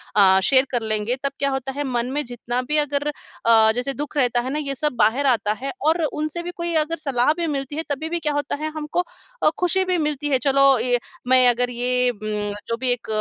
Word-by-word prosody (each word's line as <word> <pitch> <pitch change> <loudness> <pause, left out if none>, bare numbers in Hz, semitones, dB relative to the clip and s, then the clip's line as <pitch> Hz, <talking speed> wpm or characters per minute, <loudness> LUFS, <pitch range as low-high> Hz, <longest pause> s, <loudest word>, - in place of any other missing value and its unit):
अ, 190 -2 +6
share 265 +2 +4
कर 240 -2 0
लेंगे, 215 +2 -1
तब 275 - 0
क्या 280 0 +1
होता 270 0 -3
है 290 - -1
मन 245 -1 -2
में 295 +1 -1
जितना 245 +1 -3
भी 300 - +2
अगर 290 +1 -2
अ, 225 -6 +2
जैसे 250 +3 -2
दुःख 295 +1 -5
रहता 245 -3 +2
है 255 - -4
ना, 300 - -1
ये 275 -2 -3
सब 300 0 -1
बाहर 235 +7 +2
आता 225 -5 +2
है। 275 - -2
और 325 +2 +3
उनसे 310 +3 -3
भी 350 - -5
कोई 340 0 -3
अगर 330 +1 -3
सलाह 275 -1 +1
भी 340 -1 -1
मिलती 275 -1 -3
है 320 - -2
तभी 300 +3 -3
भी 345 0 -2
क्या 300 -2 -1
होता 290 0 -1
है 310 +2 -3
हमको 310 +3 -1 0.4
अ, - - +6
खुशी 370 +1 +2
भी 365 -1 +1
मिलती 300 -2 -1
है, 270 - +3
चलो 275 -1 +4
ये 245 +1 +2 0.3
मैं 255 -1 +5
अगर 245 +1 +1
ये 250 +1 +1
उम, 210 -2 -3
जो 230 - -2
भी 255 0 0
एक 245 -1 -3
270 Hz, 240 wpm, -22 LUFS, 245-300 Hz, 0.4 s, अ